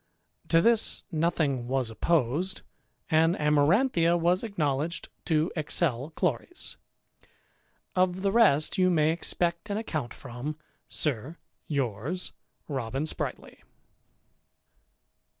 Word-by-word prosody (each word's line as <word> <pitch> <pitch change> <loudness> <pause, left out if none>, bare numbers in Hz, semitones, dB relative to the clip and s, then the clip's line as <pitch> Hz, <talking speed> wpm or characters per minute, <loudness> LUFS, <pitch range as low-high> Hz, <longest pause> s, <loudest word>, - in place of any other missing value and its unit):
To 165 - +4
this 230 +2 +3
nothing 155 -6 0
was 130 -3 0
opposed; 160 +7 0 0.5
and 165 +2 +4
Amaranthia 165 - +3
was 175 +4 +2
acknowledged 160 -6 -2 0.2
to 160 +1 +1
excel 150 -4 -1
Chloris. 180 - -2 1.2
Of 185 0 +1
the 195 - +2
rest 190 -6 +4
you 185 0 +5
may 155 -3 +3
expect 170 +3 -1
an 200 - -1
account 155 - -3
from. 135 +4 -6 0.3
Sir, 150 +2 -1 0.3
yours, 140 - -2 0.3
Robin 135 -1 -2
Spritely. 155 - -4
160 Hz, 95 wpm, -28 LUFS, 140-180 Hz, 1.2 s, you